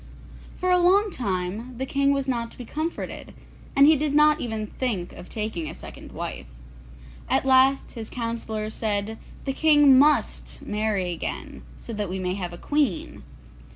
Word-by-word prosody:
For 365 0 0
a 360 - +5
long 390 +4 +4
time 210 - -3
the 265 - -2
King 280 +1 +2
was 275 -1 0
not 235 -3 -1
to - - -16
be 245 - -7
comforted, 315 +7 -5 0.4
and 275 - +7
he 315 +2 +7
did 295 0 0
not 300 +1 +5
even 220 -3 -3
think 210 -6 -3
of 180 - -11
taking 210 -8 -3
a - - -8
second - - -11
wife. - - -6 0.8
At - - +2
last 265 +1 +4
his 225 -3 -7
councillors 225 -2 -4
said, 215 0 -2 0.3
'The 270 - -1
King 295 -3 +6
must 300 +2 +2
marry 210 -4 -1
again, 170 - -5 0.2
so 230 - -8
that 210 -3 -3
we 185 - -3
may 180 -1 -1
have 180 -3 -4
a 175 - -8
queen. 300 - -1
240 Hz, 170 wpm, -25 LUFS, 210-290 Hz, 0.8 s, and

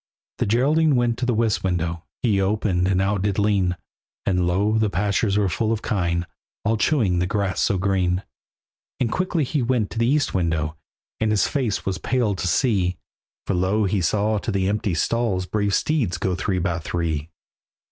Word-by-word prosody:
The - - +1
Geraldine 145 +7 +3
went 120 -1 +1
to 125 - -1
the 125 - +2
west 110 -2 +1
window, 85 -2 -1 0.2
He 105 -5 +2
opened, 95 -2 +1
and 95 -1 +2
out 100 0 +1
did 100 -1 0
lean, 100 -4 +1 0.5
And 90 -2 +1
lo! 105 +5 +2
the 110 -1 +2
pastures 100 +1 +1
were 105 -2 +2
full 95 +6 0
of 110 -1 -2
kine, 85 -5 0 0.4
All 110 +2 +2
chewing 110 - +2
the 90 - 0
grass 100 -1 -1
so 100 - +2
green. 95 -1 0 0.8
And 115 -3 0
quickly 180 -3 0
he 140 +2 -1
went 120 -4 0
to 115 - -4
the 115 - +2
east 145 +2 +1
window, 80 -4 0 0.4
And 110 - +1
his 105 -2 +2
face 125 -8 -1
was 95 -1 -2
pale 120 -4 0
to 95 - -3
see, 90 -2 +1 0.5
For - - -1
lo! 95 +4 +1
he 95 0 0
saw 105 +4 +1
to 110 - -3
the 95 -2 0
empty 100 -3 0
stalls 100 0 0
Brave 100 +1 0
steeds 125 - 0
go 95 +1 -1
three 95 +1 -1
by 90 -2 -1
three. 80 -2 -2
100 Hz, 190 wpm, -23 LUFS, 90-110 Hz, 0.8 s, Geraldine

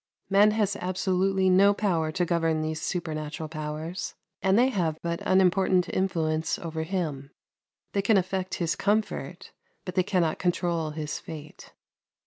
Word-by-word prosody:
Man 205 +2 +6
has 210 -2 +1
absolutely 190 +1 +1
no 195 +2 +5
power 170 -7 0
to 175 +2 0
govern 165 -2 +1
these 155 0 -3
supernatural 155 -3 -3
powers, 155 +3 -5 0.3
and 190 +1 +3
they 250 +3 +5
have 170 -9 -1
but 170 0 -2
unimportant 185 -1 +3
influence 160 -4 0
over 160 -1 -4
him. 160 -6 -3 0.6
They 200 - +2
can 200 +1 +4
affect 190 0 -1
his 170 -2 -1
comfort, 210 +2 -1 0.3
but 180 - -5
they 185 - +3
cannot 180 -4 0
control 175 -3 0
his 150 -1 -4
fate. 155 -1 -10
180 Hz, 140 wpm, -27 LUFS, 160-190 Hz, 0.6 s, Man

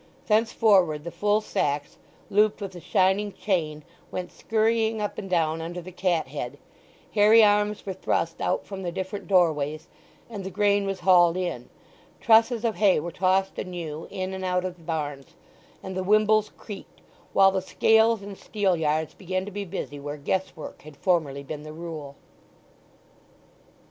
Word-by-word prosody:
Thenceforward 210 -8 +3
the 170 - -6
full 210 +3 +1
sacks, 145 -8 -2 0.3
looped 210 +1 +3
with 200 -3 -5
the 180 - -10
shining 190 +4 +2
chain, 155 -8 -2 0.3
went 180 -1 -5
scurrying 225 0 +1
up 210 -1 -3
and 195 - -7
down 165 -2 +1
under 170 +2 -5
the 180 +1 -9
cat 175 -5 0
head, 140 -1 -5 0.6
hairy 215 +2 +7
arms 210 0 +2
were 195 - -3
thrust 165 -2 -1
out - - 0
from 195 -1 -7
the 175 -2 -3
different 190 +2 -5
door 180 -5 +4
ways, 150 +1 -5 0.4
and 210 -4 -7
the 190 - -4
grain 200 +1 +2
was 195 -1 -3
hauled 175 -2 +5
in; 175 -10 -3 0.5
trusses 230 0 +4
of 220 -5 0
hay 200 -4 +4
were 170 +3 -5
tossed 190 +2 +1
anew 165 -4 -5
in 185 0 -4
and 190 0 -5
out 180 0 0
of 180 -1 -5
the 165 - -18
barns, 145 -4 -4 0.5
and 190 - -6
the 185 - -1
wimbles 215 +2 +3
creaked; 205 -3 -10 0.3
while 195 0 +6
the 190 0 -1
scales 220 +2 +3
and 200 -1 -9
steel 200 -4 0
yards 155 -1 0
began 185 0 -3
to 205 - -7
be 205 0 -4
busy 145 -4 -6
where 145 +1 -6
guess 185 +7 -2
work 155 - -9
had 150 -1 -13
formerly 150 -7 0
been 150 +1 -6
the 155 0 -9
rule. 155 -4 -7
185 Hz, 170 wpm, -26 LUFS, 160-205 Hz, 0.6 s, hairy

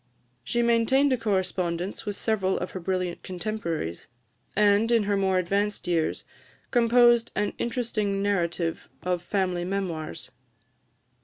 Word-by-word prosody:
She 240 - 0
maintained 235 +4 +3
a - - +4
correspondence 185 -2 -2
with 205 - -2
several 195 -3 0
of 180 - -4
her 185 - -5
brilliant 180 0 -2
contemporaries, 175 - -4 0.5
and, 210 +2 +4
in 230 -2 +4
her 205 0 +1
more 190 -1 +2
advanced 200 +3 -1
years, 165 -3 0 0.5
composed 240 -1 +5
an 205 0 0
interesting 225 -5 -1
narrative 170 -4 -1
of 180 -1 0
family 180 -1 -1
Memoirs. 175 - -4
195 Hz, 125 wpm, -26 LUFS, 180-220 Hz, 0.5 s, composed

